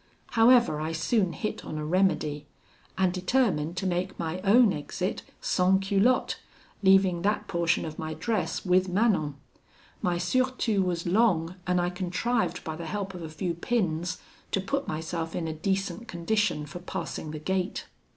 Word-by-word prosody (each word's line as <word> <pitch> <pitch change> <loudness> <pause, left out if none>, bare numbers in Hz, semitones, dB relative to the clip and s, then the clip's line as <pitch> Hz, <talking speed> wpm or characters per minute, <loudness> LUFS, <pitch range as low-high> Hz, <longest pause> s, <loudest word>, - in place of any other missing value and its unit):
However, 235 -8 +5
I 160 +1 -2
soon 185 +3 +1
hit 215 - -4
on 155 - -5
a 150 - -3
remedy, 155 -4 +1 0.5
and 185 -2 +2
determined 185 - +1
to 190 - -2
make 185 +1 -1
my 165 +1 -3
own 210 +2 +5
exit 180 +5 -3 0.2
sans 190 +1 +2
culotte, 205 +6 +2 0.4
leaving 190 -3 +4
that 205 +3 0
portion 170 -1 +1
of 155 -1 -7
my 155 0 -4
dress 220 -1 -2
with 185 0 +3
Manon. 180 -7 +2 0.7
My 175 -1 +1
surtout 230 +1 +1
was 175 -2 -2
long, 180 -3 +2
and 180 0 +2
I 175 0 0
contrived 180 +1 -1
by 160 - -4
the 165 0 -6
help 195 +1 -3
of 180 - -7
a 160 - -6
few 170 +3 -2
pins 175 -3 -1 0.3
to - - 0
put 275 +8 -2
myself 165 +1 -3
in 165 - -2
a 160 - -2
decent 190 +6 -2
condition 180 -3 0
for 155 +4 -8
passing 175 -3 -5
the 155 - -5
gate. 185 +4 -2
180 Hz, 160 wpm, -28 LUFS, 165-200 Hz, 0.7 s, However